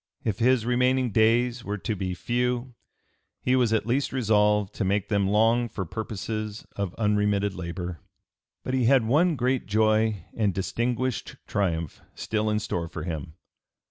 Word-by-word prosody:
If 105 Hz, -2 st, -1 dB
his 120 Hz, -1 st, +3 dB
remaining 125 Hz, 0 st, +2 dB
days 115 Hz, +3 st, +2 dB
were 105 Hz, +1 st, -3 dB
to 110 Hz, +2 st, -3 dB
be 95 Hz, -1 st, -3 dB
few 125 Hz, +4 st, -1 dB, 0.7 s
he 125 Hz, -, +3 dB
was 125 Hz, -3 st, +3 dB
at 110 Hz, -2 st, +1 dB
least 130 Hz, +4 st, 0 dB
resolved 105 Hz, -5 st, +2 dB
to -, -, -2 dB
make 100 Hz, +1 st, 0 dB
them 100 Hz, -2 st, +2 dB
long 115 Hz, +4 st, +3 dB
for 100 Hz, -, -4 dB
purposes 110 Hz, +2 st, -5 dB
of 100 Hz, -3 st, -3 dB
unremitted 105 Hz, -2 st, +1 dB
labor. 90 Hz, -1 st, -5 dB, 0.6 s
But 130 Hz, -, -3 dB
he 130 Hz, -2 st, +2 dB
had 130 Hz, -1 st, +4 dB
one 155 Hz, +8 st, +3 dB
great 130 Hz, 0 st, 0 dB
joy 110 Hz, -2 st, +2 dB
and 105 Hz, -5 st, +1 dB
distinguished 120 Hz, +5 st, -2 dB
triumph 85 Hz, -6 st, -2 dB
still 110 Hz, 0 st, -1 dB
in 105 Hz, -, +1 dB
store 85 Hz, -5 st, -2 dB
for 80 Hz, -1 st, -6 dB
him. 80 Hz, -2 st, -5 dB
110 Hz, 155 wpm, -26 LUFS, 100-120 Hz, 0.7 s, had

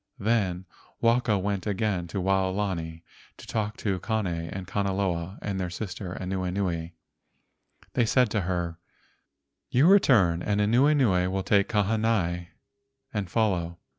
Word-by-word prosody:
Then 100 Hz, -4 st, 0 dB, 0.3 s
Waka 115 Hz, -2 st, +3 dB
went 100 Hz, +1 st, -2 dB
again 100 Hz, -3 st, -1 dB
to 95 Hz, -, -4 dB
Waolani 95 Hz, -3 st, -1 dB, 0.3 s
to -, -, -12 dB
talk 105 Hz, -2 st, -3 dB
with 95 Hz, -4 st, 0 dB
Kane 110 Hz, -2 st, -1 dB
and 85 Hz, +2 st, -4 dB
Kanaloa 95 Hz, -2 st, -1 dB
and 100 Hz, -2 st, -2 dB
their 90 Hz, -1 st, -2 dB
sister 95 Hz, 0 st, -6 dB
Anuenue. 90 Hz, -2 st, -2 dB, 1.0 s
They 120 Hz, -, +2 dB
said 125 Hz, -2 st, +3 dB
to 105 Hz, -, +1 dB
her: 85 Hz, -2 st, -2 dB, 0.9 s
"You 130 Hz, +5 st, +4 dB
return, 115 Hz, -, +5 dB
and 105 Hz, +2 st, 0 dB
Anuenue 115 Hz, -4 st, +3 dB
will 95 Hz, 0 st, -2 dB
take 100 Hz, 0 st, +2 dB
Kahanai 105 Hz, -5 st, +1 dB, 0.7 s
and 100 Hz, -4 st, -2 dB
follow. 90 Hz, -7 st, 0 dB
95 Hz, 125 wpm, -27 LUFS, 90-110 Hz, 1.0 s, return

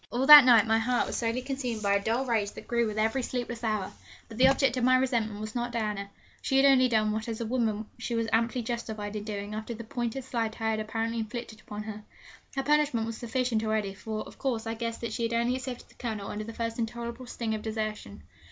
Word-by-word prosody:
All 250 Hz, +2 st, 0 dB
that 295 Hz, -1 st, +12 dB
night 235 Hz, -4 st, +7 dB
my 225 Hz, 0 st, +3 dB
heart 245 Hz, +2 st, +1 dB
was -, -, -4 dB
slowly 235 Hz, +2 st, -1 dB
consumed 250 Hz, -5 st, -3 dB
by 200 Hz, 0 st, +3 dB
a 200 Hz, 0 st, +1 dB
dull 235 Hz, +5 st, 0 dB
rage 220 Hz, -5 st, 0 dB
that -, -, -11 dB
grew 235 Hz, -1 st, +1 dB
with 215 Hz, 0 st, -4 dB
every 225 Hz, +5 st, +1 dB
sleepless 240 Hz, -1 st, -4 dB
hour; 215 Hz, -4 st, -1 dB, 0.4 s
but 225 Hz, 0 st, -10 dB
the 260 Hz, -, +7 dB
object 270 Hz, -2 st, +3 dB
of 250 Hz, -, -1 dB
my 255 Hz, +1 st, +6 dB
resentment 235 Hz, -5 st, 0 dB
was 215 Hz, 0 st, -6 dB
not 240 Hz, 0 st, -2 dB
Diana. 210 Hz, -3 st, -2 dB, 0.3 s
She 270 Hz, -, +1 dB
had 270 Hz, -, +6 dB
only 260 Hz, -2 st, +6 dB
done 215 Hz, -2 st, +2 dB
what 220 Hz, +1 st, -3 dB
as 225 Hz, -1 st, -4 dB
a 230 Hz, -, -2 dB
woman 220 Hz, -3 st, 0 dB
she 245 Hz, -1 st, -3 dB
was 230 Hz, 0 st, 0 dB
amply 235 Hz, +2 st, +1 dB
justified 220 Hz, -3 st, -4 dB
in 210 Hz, -, -3 dB
doing 205 Hz, -1 st, -5 dB
after 220 Hz, +2 st, -5 dB
the 230 Hz, -, -7 dB
pointed 240 Hz, +3 st, -3 dB
slight 230 Hz, -3 st, -3 dB
I 220 Hz, 0 st, +1 dB
had 220 Hz, -, -1 dB
apparently 225 Hz, +1 st, -2 dB
inflicted 220 Hz, 0 st, -6 dB
upon 210 Hz, 0 st, -7 dB
her. 215 Hz, -1 st, -7 dB, 0.5 s
Her 270 Hz, -, 0 dB
punishment 295 Hz, -6 st, +2 dB
was 225 Hz, -1 st, -5 dB
sufficient 240 Hz, -1 st, -1 dB
already, 215 Hz, -3 st, -1 dB
for, 215 Hz, +2 st, -5 dB
of -, -, -14 dB
course, 235 Hz, -4 st, -1 dB
I 225 Hz, -, -2 dB
guessed 230 Hz, 0 st, -4 dB
that 230 Hz, -2 st, -3 dB
she -, -, -3 dB
had 230 Hz, 0 st, 0 dB
only 235 Hz, +2 st, +1 dB
accepted 255 Hz, -1 st, -6 dB
the -, -, -19 dB
Colonel 220 Hz, -5 st, -4 dB
under 215 Hz, +1 st, -4 dB
the 230 Hz, -, -7 dB
first 230 Hz, 0 st, -3 dB
intolerable 235 Hz, +2 st, -4 dB
sting 230 Hz, -2 st, -3 dB
of 215 Hz, -, -3 dB
desertion. 215 Hz, -, -4 dB
230 Hz, 245 wpm, -28 LUFS, 215-245 Hz, 0.5 s, that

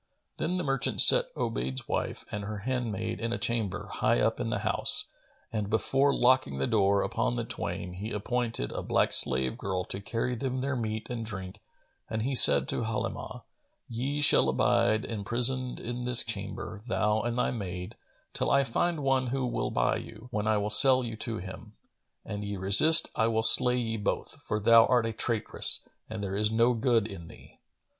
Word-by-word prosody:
Then 180 Hz, -, -2 dB
the 180 Hz, -, -2 dB
merchant 135 Hz, -, 0 dB
set -, -, +7 dB
Obayd's 65 Hz, +2 st, -3 dB
wife -, -, -3 dB
and 105 Hz, -1 st, -4 dB
her 105 Hz, 0 st, -6 dB
handmaid 115 Hz, -4 st, -3 dB
in 115 Hz, 0 st, -3 dB
a 120 Hz, -, -1 dB
chamber 115 Hz, -5 st, -2 dB
high -, -, +1 dB
up -, -, 0 dB
in -, -, -2 dB
the -, -, -2 dB
house -, -, 0 dB, 0.5 s
and, 105 Hz, -2 st, -2 dB
before 135 Hz, +6 st, +2 dB
locking 125 Hz, -, +2 dB
the 70 Hz, -, 0 dB
door 100 Hz, 0 st, +2 dB
upon -, -, -1 dB
the -, -, -2 dB
twain, 90 Hz, 0 st, -5 dB
he 100 Hz, +4 st, -6 dB
appointed 115 Hz, -, -2 dB
a -, -, -4 dB
black -, -, +1 dB
slave 65 Hz, 0 st, +2 dB
girl 95 Hz, -1 st, -2 dB
to 95 Hz, -, -5 dB
carry 115 Hz, +4 st, -3 dB
them 130 Hz, +1 st, -3 dB
their 140 Hz, 0 st, -2 dB
meat 110 Hz, -2 st, -4 dB
and 120 Hz, -2 st, -4 dB
drink 95 Hz, -2 st, -7 dB, 0.5 s
and 110 Hz, -1 st, -2 dB
he 135 Hz, +3 st, -1 dB
said 70 Hz, -, +5 dB
to -, -, -1 dB
Halimah, 110 Hz, -1 st, -4 dB, 0.4 s
"Ye 135 Hz, +5 st, -3 dB
shall 145 Hz, -, +5 dB
abide 110 Hz, +2 st, +2 dB
imprisoned 120 Hz, +4 st, -2 dB
in 120 Hz, +1 st, -5 dB
this 125 Hz, -1 st, +3 dB
chamber, 105 Hz, -1 st, -6 dB
thou 110 Hz, -2 st, +1 dB
and 120 Hz, +2 st, -3 dB
thy 125 Hz, -, +1 dB
maid, 90 Hz, -5 st, -6 dB, 0.4 s
till -, -, -1 dB
I 140 Hz, 0 st, +4 dB
find 155 Hz, +5 st, -1 dB
one 135 Hz, -1 st, +1 dB
who 130 Hz, +1 st, -2 dB
will 120 Hz, -, -2 dB
buy -, -, 0 dB
you, 115 Hz, +2 st, -11 dB
when 105 Hz, -2 st, -2 dB
I 110 Hz, -1 st, +2 dB
will 105 Hz, +1 st, -2 dB
sell 130 Hz, +3 st, +6 dB
you 115 Hz, -2 st, -5 dB
to 115 Hz, 0 st, -4 dB
him. 95 Hz, 0 st, -9 dB, 0.5 s
An 105 Hz, 0 st, -5 dB
ye 100 Hz, -1 st, -5 dB
resist, 100 Hz, -, +5 dB
I 110 Hz, -, +2 dB
will 110 Hz, -1 st, 0 dB
slay 125 Hz, +2 st, +5 dB
ye 115 Hz, -2 st, -2 dB
both, 105 Hz, -, -3 dB
for 105 Hz, -, -3 dB
thou 115 Hz, +2 st, +6 dB
art 125 Hz, -3 st, +2 dB
a 115 Hz, -, -3 dB
traitress, 110 Hz, 0 st, 0 dB, 0.3 s
and 110 Hz, -2 st, -6 dB
there 95 Hz, -1 st, -3 dB
is 105 Hz, +1 st, +1 dB
no 115 Hz, +2 st, +3 dB
good 115 Hz, -2 st, +1 dB
in 95 Hz, -6 st, -9 dB
thee." -, -, -16 dB
110 Hz, 190 wpm, -28 LUFS, 100-125 Hz, 0.5 s, set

